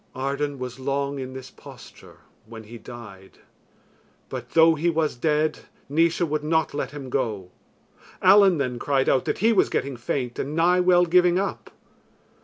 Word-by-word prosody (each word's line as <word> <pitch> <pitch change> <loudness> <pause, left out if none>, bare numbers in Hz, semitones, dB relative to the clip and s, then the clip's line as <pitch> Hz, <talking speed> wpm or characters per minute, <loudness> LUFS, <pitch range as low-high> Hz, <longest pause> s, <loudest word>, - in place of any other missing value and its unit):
Arden 140 +2 -3
was 125 0 -7
long 140 +1 -2
in 130 0 -6
this 130 -1 -9
posture - - -15 0.3
when 115 -1 -10
he 115 +2 -11
died; 105 -6 -12 0.9
but 125 -2 -7
though 165 0 +6
he 160 +3 0
was 160 -2 0
dead 155 +4 0 0.3
Naois 165 +4 +1
would 155 -3 -1
not 160 +1 0
let - - -3
him 140 -3 -9
go. 105 -9 -2 0.7
Allen 190 -1 +6
then 125 -4 -2
cried 135 -1 0
out 130 - +2
that - - -1
he 230 - +5
was 200 - +3
getting 140 -1 -2
faint 120 0 -4
and 145 +3 -3
nigh 175 +2 +3
well 180 -1 +4
giving 180 +1 +3
up. 195 +1 -3
140 Hz, 165 wpm, -24 LUFS, 130-165 Hz, 0.9 s, though